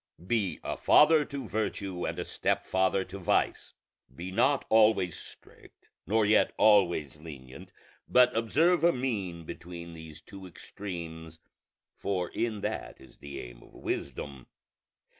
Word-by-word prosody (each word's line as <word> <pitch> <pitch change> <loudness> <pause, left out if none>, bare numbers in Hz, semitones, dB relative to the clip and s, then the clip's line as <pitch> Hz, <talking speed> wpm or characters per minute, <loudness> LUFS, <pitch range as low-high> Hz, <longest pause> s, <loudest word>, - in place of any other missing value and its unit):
Be 105 -3 0
a - - -3
father 150 0 +5
to 140 -1 -6
virtue 100 -4 -3
and - - -4
a - - -3
stepfather 95 +1 0
to 95 +2 -9
vice. 90 - 0 0.4
Be 90 +6 -6
not 130 +7 +2
always 105 -5 +4
strict, - - -14 0.2
nor 110 0 +3
yet 105 +1 +3
always 90 -9 +3
lenient, 70 -5 -11 0.4
but 125 0 +5
observe 160 +11 +2
a 170 0 +5
mean 100 -10 -3
between 85 +1 -9
these 80 -2 -10
two 95 +1 -11
extremes, 80 -3 -8 0.5
for 90 -3 -2
in 110 -3 -2
that - - -4
is 65 -2 -17
the 70 -1 -8
aim - - -11
of - - -18
wisdom. 70 -3 -5
95 Hz, 135 wpm, -29 LUFS, 85-110 Hz, 0.5 s, father